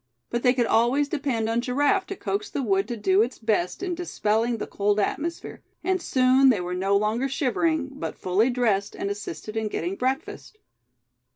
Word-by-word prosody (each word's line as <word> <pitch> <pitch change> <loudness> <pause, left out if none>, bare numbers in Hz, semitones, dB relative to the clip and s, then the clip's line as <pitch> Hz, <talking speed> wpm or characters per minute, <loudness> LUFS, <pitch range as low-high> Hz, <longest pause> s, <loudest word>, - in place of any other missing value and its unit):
But 240 - -1
they 250 +1 +3
could 245 -2 +2
always 240 +6 +2
depend 270 -7 -1
on 230 +1 +1
Giraffe 290 +10 +1
to 390 - -5
coax 405 +2 -3
the 275 - -3
wood 195 -2 +1
to 240 -1 -4
do 195 -1 +3
its 240 +3 -1
best 215 - -1
in 365 -2 -1
dispelling 230 -9 0
the - - -4
cold 205 +1 0
atmosphere; 330 +10 -3 0.2
and 370 0 0
soon 260 -2 +4
they 230 -6 +3
were 180 0 -3
no 195 +2 +2
longer 220 +6 0
shivering, 285 +2 0
but - - -4
fully 195 +7 +2
dressed, 220 -5 0
and 200 - -3
assisted 205 0 -6
in 220 -1 -1
getting 180 -2 -3
breakfast. 315 - -3
240 Hz, 185 wpm, -25 LUFS, 210-285 Hz, 0.2 s, soon